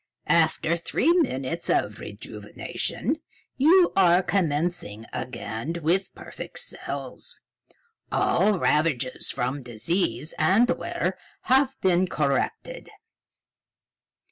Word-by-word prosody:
"After 165 Hz, 0 st, +2 dB
three 210 Hz, -, +1 dB
minutes 170 Hz, -, 0 dB
of -, -, +1 dB
rejuvenation, -, -, -4 dB, 0.4 s
you 345 Hz, +6 st, +5 dB
are 180 Hz, -1 st, +5 dB
commencing 155 Hz, -, -1 dB
again 120 Hz, +4 st, -4 dB
with 185 Hz, +5 st, +1 dB
perfect -, -, -8 dB
cells. -, -, -4 dB, 0.7 s
All 210 Hz, -2 st, +2 dB
ravages 150 Hz, -7 st, +1 dB
from 130 Hz, +3 st, -2 dB
disease 125 Hz, -, -1 dB
and 190 Hz, +10 st, +4 dB
wear -, -, -2 dB, 0.2 s
have 265 Hz, +1 st, +2 dB
been 185 Hz, 0 st, +3 dB
corrected." 140 Hz, -5 st, -2 dB
170 Hz, 90 wpm, -25 LUFS, 135-195 Hz, 0.7 s, you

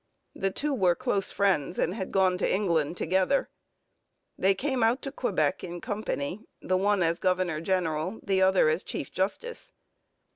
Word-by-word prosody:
The 195 Hz, -, -1 dB
two 290 Hz, +9 st, -1 dB
were 185 Hz, -8 st, +3 dB
close 205 Hz, -5 st, 0 dB
friends 185 Hz, -5 st, +1 dB
and 175 Hz, -, 0 dB
had 190 Hz, -3 st, -5 dB
gone 185 Hz, -2 st, +2 dB
to -, -, +1 dB
England 170 Hz, -5 st, +1 dB
together. 190 Hz, -, +1 dB, 0.9 s
They 195 Hz, +1 st, +2 dB
came 265 Hz, +3 st, -1 dB
out 230 Hz, +4 st, +2 dB
to 275 Hz, -, -4 dB
Quebec 180 Hz, -, 0 dB
in 175 Hz, -1 st, -6 dB
company, 205 Hz, -, -3 dB, 0.2 s
the 185 Hz, -, -1 dB
one 200 Hz, 0 st, +2 dB
as 170 Hz, +1 st, +1 dB
governor 180 Hz, -4 st, 0 dB
general, 180 Hz, +1 st, -1 dB
the 195 Hz, -2 st, +1 dB
other 190 Hz, -3 st, +4 dB
as 155 Hz, +3 st, +1 dB
chief 135 Hz, -, -5 dB
justice. 205 Hz, -, -3 dB
190 Hz, 160 wpm, -28 LUFS, 175-205 Hz, 0.9 s, other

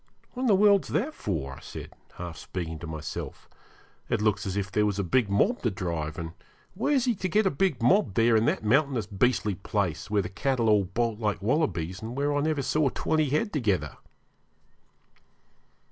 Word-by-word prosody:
'What 250 Hz, -, -6 dB
in 260 Hz, -, +1 dB
the 210 Hz, -, +5 dB
world's 200 Hz, 0 st, +4 dB
that 245 Hz, -, -1 dB
for?' 75 Hz, -, -3 dB
I -, -, -10 dB
said, -, -, -9 dB, 0.2 s
half 85 Hz, -2 st, -6 dB
speaking 80 Hz, -3 st, -5 dB
to 85 Hz, -, -7 dB
myself. 80 Hz, -1 st, -6 dB, 0.6 s
'It -, -, +1 dB
looks 105 Hz, -2 st, +1 dB
as 95 Hz, +1 st, -2 dB
if 95 Hz, -2 st, -2 dB
there 105 Hz, 0 st, +2 dB
was 100 Hz, -1 st, -1 dB
a 100 Hz, -, 0 dB
big 105 Hz, +4 st, +2 dB
mob 150 Hz, -, +2 dB
to 120 Hz, -, +1 dB
drive, 85 Hz, -6 st, -3 dB
and 85 Hz, -1 st, -5 dB, 0.4 s
where's 260 Hz, +5 st, +1 dB
he 245 Hz, -, +2 dB
to 185 Hz, -3 st, -3 dB
get 215 Hz, +5 st, +3 dB
a 190 Hz, -, +3 dB
big 150 Hz, -5 st, 0 dB
mob 125 Hz, -, +3 dB
there 115 Hz, 0 st, +4 dB
in 110 Hz, +1 st, +3 dB
that -, -, 0 dB
mountainous, 130 Hz, -1 st, +2 dB
beastly 105 Hz, 0 st, +1 dB
place, 95 Hz, -3 st, -2 dB
where 105 Hz, -1 st, +2 dB
the -, -, -4 dB
cattle 120 Hz, +2 st, 0 dB
all 105 Hz, -2 st, +4 dB
bolt 115 Hz, +3 st, -1 dB
like 105 Hz, -3 st, -1 dB
wallabies, 95 Hz, -, 0 dB
and 115 Hz, +3 st, -6 dB
where 145 Hz, +1 st, +1 dB
I 145 Hz, -, +1 dB
never 155 Hz, -2 st, 0 dB
saw 140 Hz, +2 st, +2 dB
twenty 155 Hz, +2 st, 0 dB
head 155 Hz, -, 0 dB
together?' 110 Hz, -, 0 dB
110 Hz, 195 wpm, -27 LUFS, 95-150 Hz, 0.6 s, the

